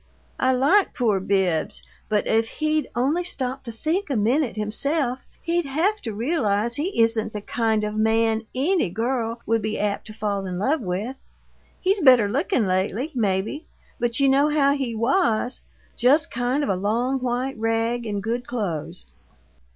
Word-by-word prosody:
I 260 Hz, 0 st, +3 dB
like 285 Hz, +11 st, +3 dB
poor 220 Hz, -6 st, +1 dB
Bibbs, 190 Hz, -4 st, 0 dB, 0.3 s
but 210 Hz, -1 st, +1 dB
if 225 Hz, 0 st, +2 dB
he'd 310 Hz, 0 st, 0 dB
only 280 Hz, +9 st, +1 dB
stop 265 Hz, -5 st, -4 dB
to 235 Hz, -, -5 dB
think 315 Hz, -, -2 dB
a 275 Hz, -, 0 dB
minute 240 Hz, +5 st, +1 dB
himself 250 Hz, +5 st, 0 dB, 0.2 s
he'd 340 Hz, 0 st, 0 dB
have 345 Hz, +10 st, 0 dB
to 225 Hz, -, -4 dB
realize 225 Hz, -2 st, 0 dB
he 300 Hz, -, +1 dB
isn't 225 Hz, -1 st, +1 dB
the 210 Hz, -, -4 dB
kind 220 Hz, 0 st, 0 dB
of 210 Hz, 0 st, -2 dB
man 220 Hz, 0 st, +1 dB
ANY 305 Hz, -, +1 dB
girl 230 Hz, +3 st, -2 dB
would 225 Hz, 0 st, +1 dB
be 215 Hz, +1 st, -2 dB
apt 205 Hz, 0 st, -2 dB
to 215 Hz, -, -9 dB
fall 200 Hz, -3 st, -2 dB
in 180 Hz, -1 st, -4 dB
love 270 Hz, -, +1 dB
with. 210 Hz, +7 st, -3 dB, 0.6 s
He's 390 Hz, +2 st, +1 dB
better 255 Hz, -, +6 dB
looking 265 Hz, -, 0 dB
lately, 195 Hz, -, -1 dB
maybe, 215 Hz, -, -1 dB, 0.3 s
but 235 Hz, +1 st, 0 dB
you 275 Hz, -, +4 dB
know 275 Hz, +2 st, +4 dB
how 285 Hz, -2 st, +3 dB
he 265 Hz, -5 st, -2 dB
WAS 240 Hz, -, +1 dB, 0.3 s
just 275 Hz, +6 st, +3 dB
kind 245 Hz, +4 st, 0 dB
of -, -, -1 dB
a 195 Hz, -, +2 dB
long 235 Hz, +8 st, 0 dB
white 250 Hz, 0 st, -2 dB
rag 225 Hz, +1 st, 0 dB
in 205 Hz, -1 st, -2 dB
good 240 Hz, +4 st, -3 dB
clothes. 175 Hz, -8 st, -4 dB
235 Hz, 165 wpm, -23 LUFS, 215-275 Hz, 0.6 s, better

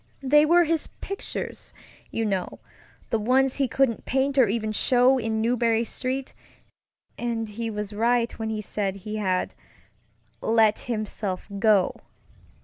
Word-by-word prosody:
They 295 Hz, +3 st, +5 dB
were 345 Hz, +2 st, +6 dB
his 325 Hz, -1 st, 0 dB
pictures, 395 Hz, -, -6 dB, 0.3 s
you 225 Hz, -, -2 dB
knowŌĆöthe 200 Hz, +3 st, -5 dB
ones 255 Hz, +4 st, +2 dB
he 275 Hz, -2 st, +2 dB
couldn't 250 Hz, -2 st, +1 dB
paint 270 Hz, +1 st, +1 dB
or 250 Hz, -, +6 dB
even 215 Hz, +1 st, -1 dB
show 250 Hz, +4 st, +3 dB
in 220 Hz, -1 st, -1 dB
Marlborough 230 Hz, -1 st, +2 dB
StreetŌĆöand 240 Hz, -2 st, -6 dB
he 225 Hz, +2 st, -4 dB
was 210 Hz, -1 st, -5 dB
right 235 Hz, +2 st, +2 dB
when 220 Hz, 0 st, -2 dB
he 215 Hz, -1 st, -2 dB
said 200 Hz, -2 st, -2 dB
he 210 Hz, +2 st, -6 dB
had 185 Hz, -3 st, -1 dB, 0.9 s
"let 220 Hz, -1 st, +3 dB
himself 215 Hz, -5 st, -4 dB
go." 210 Hz, -3 st, +3 dB
225 Hz, 130 wpm, -25 LUFS, 215-255 Hz, 0.9 s, were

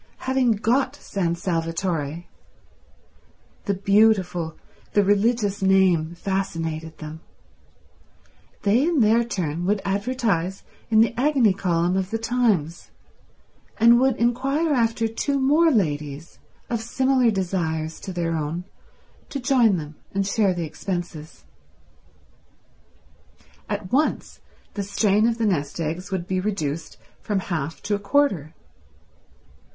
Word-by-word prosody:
Having 260 Hz, -3 st, +2 dB
got 255 Hz, +6 st, +1 dB
San 175 Hz, -10 st, -2 dB
Salvatore—the 165 Hz, -2 st, -2 dB, 1.5 s
beautiful, 190 Hz, -5 st, +2 dB, 0.4 s
the 205 Hz, -, +4 dB
religious 205 Hz, 0 st, +1 dB
name, 185 Hz, -4 st, +3 dB
fascinated 165 Hz, -4 st, -3 dB
them—they 160 Hz, +7 st, -6 dB
in 320 Hz, -2 st, +2 dB
their 225 Hz, +2 st, +4 dB
turn 175 Hz, -8 st, -3 dB
would 205 Hz, +1 st, +2 dB
advertise 200 Hz, -3 st, -1 dB, 0.3 s
in 220 Hz, -1 st, +5 dB
the 230 Hz, -, +3 dB
Agony 260 Hz, -7 st, +3 dB
Column 175 Hz, -2 st, 0 dB
of 190 Hz, -1 st, -1 dB
The 225 Hz, -, -1 dB
Times, 225 Hz, -9 st, 0 dB, 0.9 s
and 235 Hz, +2 st, +7 dB
would 265 Hz, -1 st, +3 dB
inquire 275 Hz, +7 st, +1 dB
after 230 Hz, -2 st, +1 dB
two 275 Hz, +5 st, -1 dB
more 300 Hz, +5 st, +4 dB
ladies, 150 Hz, -, -2 dB, 0.3 s
of 235 Hz, -2 st, -2 dB
similar 260 Hz, +1 st, +2 dB
desires 170 Hz, -5 st, -2 dB
to 190 Hz, -, -7 dB
their 170 Hz, -2 st, -1 dB
own, 160 Hz, +3 st, -3 dB, 0.7 s
to 280 Hz, -, -4 dB
join 245 Hz, -7 st, +3 dB
them 150 Hz, -1 st, -8 dB, 0.2 s
and 195 Hz, 0 st, +1 dB
share 200 Hz, -2 st, +1 dB
the 170 Hz, -1 st, -2 dB
expenses. 170 Hz, -1 st, -6 dB, 2.2 s
At 185 Hz, -, -4 dB
once 300 Hz, +4 st, 0 dB, 0.3 s
the 205 Hz, -, -3 dB
strain 205 Hz, +2 st, +2 dB
of 230 Hz, -1 st, 0 dB
the 230 Hz, -, 0 dB
nest 150 Hz, -7 st, -1 dB
eggs 165 Hz, +4 st, -3 dB
would 185 Hz, -3 st, -3 dB
be 185 Hz, 0 st, -1 dB
reduced 165 Hz, -6 st, -3 dB, 0.2 s
from 210 Hz, -, -1 dB
half 165 Hz, -4 st, -4 dB
to 205 Hz, -, -1 dB
a 205 Hz, -, 0 dB
quarter. 200 Hz, -, +1 dB
195 Hz, 115 wpm, -23 LUFS, 170-230 Hz, 2.2 s, and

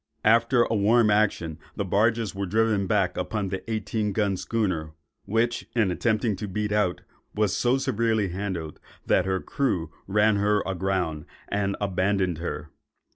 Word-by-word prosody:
After 115 Hz, +2 st, +5 dB
a -, -, -2 dB
warm 110 Hz, +1 st, +4 dB
action, 90 Hz, -6 st, +1 dB, 0.2 s
the 100 Hz, -, -2 dB
barges 110 Hz, +2 st, +1 dB
were 100 Hz, 0 st, -3 dB
driven 110 Hz, -1 st, +1 dB
back 95 Hz, -2 st, +1 dB
upon 105 Hz, -3 st, -2 dB
the 95 Hz, 0 st, -3 dB
eighteen 105 Hz, -1 st, -1 dB
gun 100 Hz, -2 st, +1 dB
schooner, 90 Hz, -7 st, -2 dB, 0.3 s
which, 115 Hz, +3 st, 0 dB
in 110 Hz, -6 st, +2 dB
attempting 110 Hz, +2 st, 0 dB
to 105 Hz, -, -4 dB
beat 105 Hz, +2 st, -2 dB
out, 105 Hz, -4 st, +1 dB, 0.3 s
was 105 Hz, -2 st, +1 dB
so 125 Hz, +2 st, +2 dB
severely 115 Hz, -6 st, 0 dB
handled, 90 Hz, -4 st, -4 dB, 0.3 s
that 95 Hz, -, +2 dB
her 95 Hz, 0 st, +1 dB
crew 90 Hz, -, -1 dB, 0.2 s
ran 105 Hz, +1 st, +3 dB
her 105 Hz, 0 st, +2 dB
aground 90 Hz, -4 st, -1 dB, 0.2 s
and 100 Hz, -1 st, -1 dB
abandoned 95 Hz, -3 st, 0 dB
her. 80 Hz, -2 st, -5 dB
100 Hz, 150 wpm, -26 LUFS, 95-110 Hz, 0.3 s, After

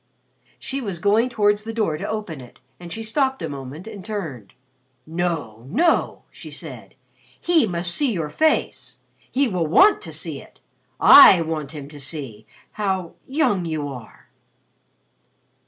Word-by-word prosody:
She 275 Hz, +1 st, -4 dB
was 200 Hz, -7 st, -4 dB
going 210 Hz, +7 st, +2 dB
towards 205 Hz, -3 st, +1 dB
the 225 Hz, 0 st, -6 dB
door 210 Hz, -9 st, 0 dB
to -, -, -5 dB
open 210 Hz, -10 st, -5 dB
it 125 Hz, -, -15 dB, 0.2 s
and 175 Hz, -1 st, -10 dB
she 225 Hz, +5 st, -5 dB
stopped 265 Hz, -, 0 dB
a -, -, -2 dB
moment 140 Hz, +4 st, -8 dB
and 210 Hz, -4 st, -9 dB
turned. 160 Hz, -, -6 dB, 0.5 s
"No, 160 Hz, -9 st, -3 dB
no!" 325 Hz, -, +1 dB
she -, -, -11 dB
said. -, -, -9 dB, 0.4 s
"He 330 Hz, -8 st, +3 dB
must 170 Hz, -1 st, -2 dB
see 285 Hz, +2 st, +1 dB
your 165 Hz, -7 st, -3 dB
face. 315 Hz, -, 0 dB, 0.3 s
He 275 Hz, +1 st, +2 dB
will 180 Hz, -7 st, -1 dB
want 390 Hz, -, +5 dB
to -, -, -8 dB
see -, -, -5 dB
it. -, -, -19 dB, 0.4 s
I 355 Hz, -, +9 dB
want 155 Hz, -2 st, -4 dB
him 145 Hz, -3 st, -8 dB
to 145 Hz, -1 st, -11 dB
see 135 Hz, -7 st, -6 dB, 0.2 s
how 190 Hz, -5 st, -2 dB
young 260 Hz, -, +1 dB
you 155 Hz, -3 st, -3 dB
are." 125 Hz, -4 st, -12 dB
180 Hz, 155 wpm, -22 LUFS, 155-225 Hz, 0.5 s, I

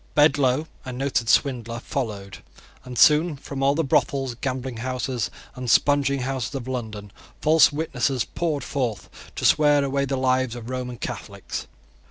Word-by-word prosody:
Bedloe, 145 Hz, -1 st, +4 dB, 0.2 s
a 130 Hz, -, -6 dB
noted 125 Hz, -2 st, -1 dB
swindler, 120 Hz, -4 st, +1 dB
followed; 100 Hz, -, -4 dB, 0.4 s
and 125 Hz, -1 st, -8 dB
soon 150 Hz, +5 st, +5 dB
from 140 Hz, 0 st, -7 dB
all 140 Hz, +1 st, +3 dB
the 165 Hz, -, +1 dB
brothels, 135 Hz, -2 st, +1 dB
gambling 130 Hz, 0 st, -4 dB
houses, 130 Hz, -1 st, -2 dB, 0.2 s
and 125 Hz, -2 st, -5 dB
spunging 140 Hz, +1 st, +3 dB
houses 130 Hz, 0 st, -3 dB
of 130 Hz, -2 st, -5 dB
London, 110 Hz, -5 st, -5 dB, 0.3 s
false 155 Hz, 0 st, +5 dB
witnesses 140 Hz, -4 st, -1 dB
poured 155 Hz, -5 st, -2 dB
forth 120 Hz, -8 st, -3 dB, 0.2 s
to -, -, -3 dB
swear 145 Hz, -1 st, +5 dB
away 140 Hz, 0 st, 0 dB
the 135 Hz, 0 st, -2 dB
lives 130 Hz, -2 st, +1 dB
of 120 Hz, +1 st, -7 dB
Roman 125 Hz, -1 st, -4 dB
Catholics. -, -, -6 dB
130 Hz, 150 wpm, -24 LUFS, 125-140 Hz, 0.4 s, soon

